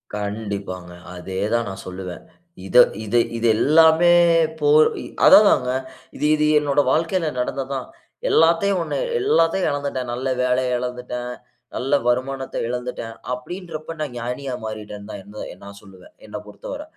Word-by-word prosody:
கண்டிப்பாங்க 100 -4 -5 0.2
அதே 95 +1 -6
தான் 115 -2 +1
நான் 95 0 -8
சொல்லுவேன். 90 -1 -7 0.4
இத 120 - +1 0.3
இது, 110 +3 +2 0.2
இது 115 - +1
எல்லாமே, 160 +5 +5 0.5
போ 145 -1 +2 0.6
அதா - - +10
தாங்க. 125 0 +2 0.4
இது, - - -2
இது 150 0 +1
என்னோட 145 -1 0
வாழ்க்கையில 165 +1 0
நடந்தது 130 +2 -3
தான். 130 - -5 0.4
எல்லாத்தையும் 170 +4 +3
1, - - -3 0.2
எல்லாத்தையும் 185 - +2
இழந்துட்டேன். 140 -3 -3
நல்ல 130 +2 -3
வேலைய 125 0 +1
இழந்துட்டேன், 125 0 -5 0.4
நல்ல 135 +3 -2
வருமானத்த 130 +2 -1
இழந்துட்டேன் 125 -2 -5 0.2
அப்பிடின்றப்ப 165 +4 -7
நான் 145 -5 -4
ஞானியா 125 +3 -4
மாறிட்டேன்னு 105 -1 -7
தான், 100 - -7
எந் 105 +2 -14 0.2
எந் 90 - -17
நான் 100 0 -11
சொல்லுவேன். 95 -3 -17
என்ன 105 - -6
பொறுத்தவர. 280 - -8
125 Hz, 140 wpm, -22 LUFS, 105-150 Hz, 0.6 s, அதா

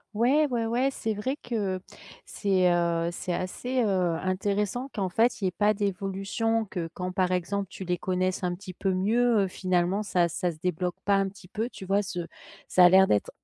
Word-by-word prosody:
Ouais, 275 +7 +3
ouais, 235 -3 -1
ouais, 245 +4 +1
c'est 220 -4 -2
vrai 255 +7 -2
que 205 -8 -2 0.5
c'est, 190 -3 +1
heu, 170 -1 +1
c'est 175 +1 -5
assez, 245 +8 -1
heu, 185 -5 +1
intéressant 200 +6 -1
qu'en 195 -4 -2
fait, 225 +7 +2
il 195 - -2
y - - +4
ait - - -10
pas 210 +2 +2
d'évolution, 200 +3 -1
que 170 -4 -4
quand 180 0 -3
par 185 -1 +1
exemple 190 +2 -1
tu 190 - -8
les 180 0 -1
connaisses 185 0 -1
un 175 0 0
petit 185 0 -9
peu 190 +1 -1
mieux, 225 +3 +3
heu, 195 - +1
finalement 185 +2 0
ça 180 -4 +2
ça 175 +1 -2
se 155 - -13
débloque 180 +1 -2
pas 200 - +3
un 195 0 +1
petit 190 -2 -15
peu, 220 +5 -3
tu 190 - -10
vois? 200 +2 +2
Ce 175 -4 -4 0.4
ça 180 -1 +6
a - - +9
l'air 190 +1 +7
d'être 105 - +1
190 Hz, 210 wpm, -27 LUFS, 180-215 Hz, 0.5 s, a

